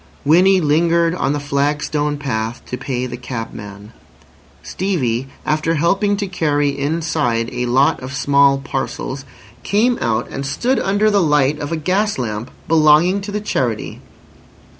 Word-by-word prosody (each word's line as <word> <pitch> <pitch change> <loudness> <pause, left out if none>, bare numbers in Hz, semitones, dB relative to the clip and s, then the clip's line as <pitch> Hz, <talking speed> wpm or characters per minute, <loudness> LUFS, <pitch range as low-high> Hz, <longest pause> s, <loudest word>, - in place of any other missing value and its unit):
Winnie 185 +6 +5
lingered 165 +2 +2
on 175 - -1
the 145 - -2
flagstone 145 +1 -1
path 115 -4 -3
to - - -5
pay 125 -1 -3
the 125 -1 -6
cabman. 110 -4 -8 0.7
Stevie, 135 -10 -1 0.2
after 155 +2 0
helping 195 +6 +1
to 200 - -2
carry 150 -6 0
inside 140 -5 -1
a 125 0 -2
lot 130 +4 +3
of 130 +1 -7
small 140 0 +4
parcels, 135 0 -4 0.4
came 235 +5 +1
out 115 0 0
and 135 - -4
stood 240 - 0
under 205 +2 +2
the 200 -1 +3
light 150 -2 +2
of 145 - -5
a 165 - -1
gas 195 +6 0
lamp 115 -1 -4 0.2
belonging 165 +4 +4
to 205 +1 -6
the 210 +1 -3
Charity. 120 - -2
145 Hz, 145 wpm, -18 LUFS, 130-170 Hz, 0.7 s, Winnie